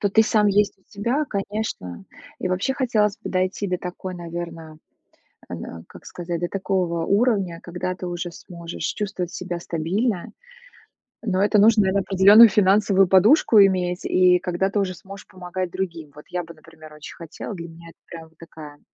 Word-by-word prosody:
То 200 - +1
ты 220 +2 +5
сам 215 -1 +2
есть 205 0 +2
у - - -33
себя, 235 +9 -1
конечно. 200 - -5 0.3
И 185 - -3
вообще 185 +9 -1
хотелось 215 -6 +1
бы - - -7
дойти 185 +2 -1
до 180 -1 -2
такой, 180 +1 -7
наверно, 170 -2 -8 0.7
э, - - -6
нэ 85 -1 -8
как - - -15
сказать, 175 -1 -5
до 175 - -2
такого 185 -4 -1
уровня, 200 -5 +1
когда 180 +1 -4
ты 180 - -7
уже 175 0 -4
сможешь 170 0 -9
чувствовать 190 -4 -3
себя 175 -1 -5
стабильно. 175 +6 -2 0.9
Но 195 -5 -1
это 210 0 +3
нужно, 220 +1 +5
наверно, 190 +1 +1
определенную 200 +4 +7
финансовую 195 0 +3
подушку 210 - +5
иметь, 180 -2 +1
и 180 -1 +4
когда 180 +1 -1
ты 205 - -1
уже 185 -2 -2
сможешь 195 +2 -12
помогать 185 -1 -5
другим. 165 -6 -5
Вот 150 - -13
я 180 -1 -3
бы, 170 0 -12
например, 155 -1 -16
очень 150 -1 -11
хотела. 165 +5 -8
Для 170 -3 -7
меня 165 +1 -13
это - - -19
прям 165 -1 -10
такая 155 -3 -12
185 Hz, 175 wpm, -22 LUFS, 170-200 Hz, 0.9 s, определенную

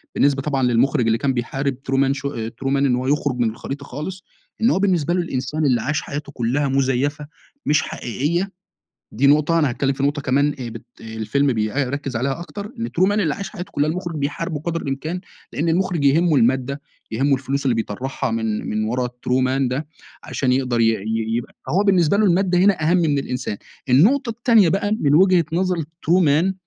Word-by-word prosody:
بالنسبة 140 -1 +2
طبعًا 135 -2 -1
للمخرج 125 +2 +2
اللي 115 0 +2
كان 135 +2 0
بيحارب 135 +3 -2 0.2
true - - +2
man 135 0 +3
show 140 0 -3
آآ، 110 0 -4
true - - -1
man 140 - +2
إن 135 -2 +2
هو 125 +1 -2
يخرُج 145 -2 0
من 120 -2 +2
الخريطة 140 +5 -7
خالص، 165 +8 -6 0.4
إن 230 - +4
هو 190 - +2
بالنسبة 175 -5 +1
له 180 - +1
الإنسان 150 -1 -2
اللي 125 -4 +2
عاش 150 +5 -1
حياته 145 0 -6
كلّها 130 +3 0
مزيفة 135 +2 0 0.4
مش 150 +1 +3
حقيقيّة، 165 - -2 0.6
دي 130 +6 +2
نقطة 150 +3 +4
أنا 150 -3 +3
هاتكلم 135 +2 0
في 135 - -5
نقطة 145 +1 0
كمان 140 +2 +2
آآ، 120 - -4
بت 115 -1 -9 0.2
آآ، - - -12
الفيلم 140 +5 +1
بيركز 130 +4 -2
عليها 135 +6 -1
أكتر 200 +4 -7
إن 230 - -2
true 185 +3 +2
man - - +1
اللي 190 -8 +1
عاش 200 - -6
حياته 180 -3 -7
كلّها 145 +1 +1
المخرج 175 -1 -4
بيحاربه 150 +2 -3
قدر 165 +1 -3
الإمكان 155 +6 -3 0.3
لأن 160 +4 -1
المخرج 175 -2 0
يهمه 155 +3 +4
المادة، 130 +3 +1 0.3
يهمه 135 +5 +2
الفلوس 140 +1 -2
اللي 130 -3 +2
بيطرحها 125 +4 -3
من 110 -1 -2
من 110 0 -1
ورا 125 +3 -1
الtrue 125 +1 -1
man 130 0 +1
ده 135 +5 -3 0.4
عشان 130 -2 0
يقدر 125 -2 +1
ي 115 - +5
ي 110 +2 -2
يبقى 120 - -6
فهو 190 +5 +2
بالنسبة 185 -3 +3
له 215 - +3
المادة 180 0 +2
هنا 190 -2 +3
أهم 180 - +4
من 155 -5 +2
الإنسان. 125 -5 -3 0.3
النقطة 230 - +4
التانية 230 -4 +4
بقى 200 +4 0
من 145 0 +3
وجهة 180 0 +5
نظر 180 +1 +1
الtrue 165 +3 0
man 155 +7 +3
140 Hz, 205 wpm, -21 LUFS, 125-170 Hz, 0.6 s, ي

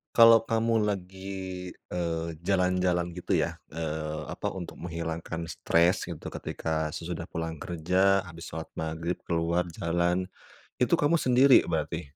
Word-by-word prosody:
kalau 115 -1 +9
kamu 115 -1 +2
lagi, 95 -1 -5 0.2
eee, 85 -2 -2 0.2
jalan-jalan 90 -2 +2
gitu 90 +1 -3
ya, - - 0 0.2
eee, 80 -1 -3
apa, - - -3
untuk 90 -2 -7
menghilangkan 85 -1 -4
stress 85 +5 +2
gitu 85 -4 -6
ketika 80 -1 -2
sesudah 85 0 -4
pulang 80 -1 -4
kerja, 95 +3 +2
habis 85 -2 -10
sholat 80 0 -6
Maghrib, 80 +2 -3
keluar 85 +1 +1
jalan, 85 +2 0 0.5
itu 125 - 0
kamu 150 +3 +3
sendiri 130 -2 +6
berarti? 80 0 -2
85 Hz, 130 wpm, -28 LUFS, 80-95 Hz, 0.5 s, kalau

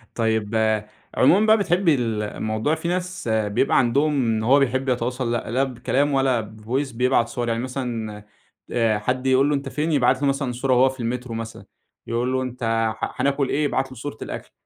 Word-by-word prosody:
طيب، 110 -2 0 0.6
عمومًا 190 +11 +5
بقى 220 0 +6
بتحبّي 175 -4 +2
ال 115 -4 -1
الموضوع 110 +7 -1
في 160 +1 -5
ناس 180 -2 -3
بيبقى 110 +3 +1
عندهم 140 +5 +2
إن 110 -2 0
هو 135 +5 +5
بيحب 130 0 0
يتواصل 125 0 -1
لأ 120 -2 -2
لا 130 +3 +2
بكلام 135 +2 0
ولا 135 -3 +2
بفويس 110 +6 -4
بيبعت 125 0 +2
صور. 120 0 -3
يعني 115 +1 -1
مثلًا 115 -5 -4 0.5
آآ 115 -3 +1
حد 125 +4 -2
يقول 130 +2 +4
له 150 - +2
أنت 140 -1 -4
فين؟ 150 +4 -1
يبعت 135 -2 +2
له 145 - +2
مثلًا 135 -2 0
صورة 130 +2 0
هو 130 +1 +5
في 130 0 -10
المترو 120 +1 -3
مثلًا، 115 0 -7 0.4
يقول 120 +2 -1
له 130 - +1
أنت 125 -1 -6 0.3
ح - - -4
هناكل 140 -1 +1
إيه؟ 150 - 0
يبعت 135 -2 -1
له 130 - -10
صورة 125 0 -6
الأكل. - - -7
125 Hz, 190 wpm, -23 LUFS, 115-140 Hz, 0.6 s, بقى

